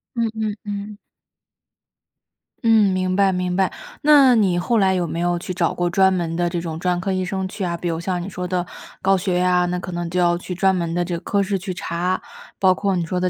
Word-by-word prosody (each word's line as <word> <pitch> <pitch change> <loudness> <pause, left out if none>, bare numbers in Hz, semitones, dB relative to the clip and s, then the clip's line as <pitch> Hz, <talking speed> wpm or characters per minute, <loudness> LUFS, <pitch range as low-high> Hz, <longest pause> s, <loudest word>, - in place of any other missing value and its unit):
嗯 230 -1 0
嗯 215 -2 -2
嗯。 205 0 -6 1.7
嗯， 220 -4 +5
明 185 0 0
白， 195 -1 +4
明 180 -1 -1
白， 190 -1 +2 0.3
那 285 -4 +6
你 190 -5 +2
后 225 +6 +1
来 190 -1 +3
有 175 -2 0
没 165 - -4
有 175 0 0
去 185 - -5
找 170 -1 0
过 175 0 -1
专 190 +1 +4
门 170 -2 -2
的 175 0 0
这 175 -1 -2
种 165 -2 -5
专 180 +1 0
科 190 +1 -2
医 185 0 -1
生 190 +1 -3
去 195 +1 -6
啊？ 170 -1 -2
比 175 - -4
如 165 -1 -1
像 180 0 -2
你 185 - -5
说 180 -1 -5
的 180 -1 -1 0.4
高 195 0 +3
血 180 -1 0
压， 180 0 +3
那 180 0 -2
可 180 0 -7
能 175 -1 -3
就 180 +1 -1
要 175 -1 +3
去 180 +1 -6
专 190 +1 +2
门 170 -2 -2
的 175 0 0
这 175 -1 -3
科 200 +3 0
室 195 0 0
去 185 0 -5
查； 180 +1 -2 0.4
包 185 -1 +5
括 195 -1 -1
你 170 - -1
说 180 +2 -3
的 180 0 +1
180 Hz, 255 characters per minute, -21 LUFS, 175-195 Hz, 1.7 s, 那